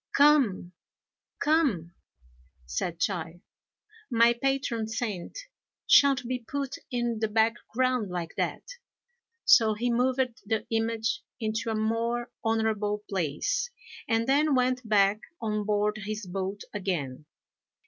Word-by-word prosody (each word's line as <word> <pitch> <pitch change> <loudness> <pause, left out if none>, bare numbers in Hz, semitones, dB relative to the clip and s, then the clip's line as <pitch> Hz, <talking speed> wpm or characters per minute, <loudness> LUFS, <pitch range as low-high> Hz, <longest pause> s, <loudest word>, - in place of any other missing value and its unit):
"Come! 275 -11 +4 0.7
come!" 270 - +1 0.7
said 160 - -3
Chai, 175 -3 -2 0.7
"my 235 -1 +5
patron 245 -3 -1
saint 220 - -4 0.5
shan't 275 -3 +5
be 250 0 -2
put 275 +3 -4
in 240 -3 -1
the 220 - +1
background 230 +1 +1
like 175 -2 -4
that;" - - -2 0.8
so 220 -2 +6
he 240 +3 0
moved 250 0 0
the 220 +1 -1
image 225 0 0 0.2
into 220 +1 -2
a 220 - -1
more 230 +2 -1
honourable 215 -2 0
place, 195 - -1 0.4
and 225 0 +1
then 285 +2 +3
went 250 -2 0
back 200 0 +4 0.2
on 215 -2 -2
board 210 0 +1
his 215 0 -5
boat 190 +2 -4
again. 160 -9 -3
225 Hz, 115 wpm, -28 LUFS, 205-250 Hz, 0.8 s, so